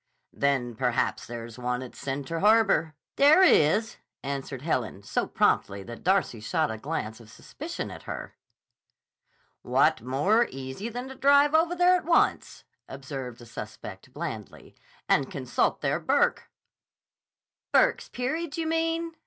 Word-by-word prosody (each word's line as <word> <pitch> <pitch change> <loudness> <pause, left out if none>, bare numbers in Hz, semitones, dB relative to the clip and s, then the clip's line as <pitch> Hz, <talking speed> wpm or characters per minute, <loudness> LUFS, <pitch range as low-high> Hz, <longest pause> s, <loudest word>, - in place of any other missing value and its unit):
"Then 135 -4 0
perhaps 125 +1 -1
there 115 -1 -6
is 115 +1 -12
one 125 +1 -2
at 125 - -11
Center 140 +4 -4
Harbor." 205 -6 +3 0.2
"There 300 +7 +7
is," 215 - +4 0.3
answered 135 -1 -5
Helen, 115 - -2
so - - -1
promptly 100 0 +1
that 120 +3 -10
Darcy 185 - +1
shot 155 +7 -1
a 110 - -6
glance 110 -5 -4
of 115 -2 -15
suspicion - - -7
at - - -9
her. - - -6 1.3
"What - - +2
more 150 - +2
easy 135 - -6
than 245 +2 -6
to - - -7
drive 280 +2 +4
over 330 +2 +3
there 360 +1 +5
at - - -8
once," 335 - +1 0.3
observed 135 -3 -7
the 120 - -13
suspect 105 -1 -9
blandly, 145 -8 -7 0.3
"and 140 -2 +2
consult 130 -3 -1
their - - 0
Burke." 485 +1 +1 1.2
"Burke's - - +3
Peerage, 310 +6 -3
you 330 - -1
mean?" 330 +1 -1
145 Hz, 140 wpm, -27 LUFS, -, 1.3 s, There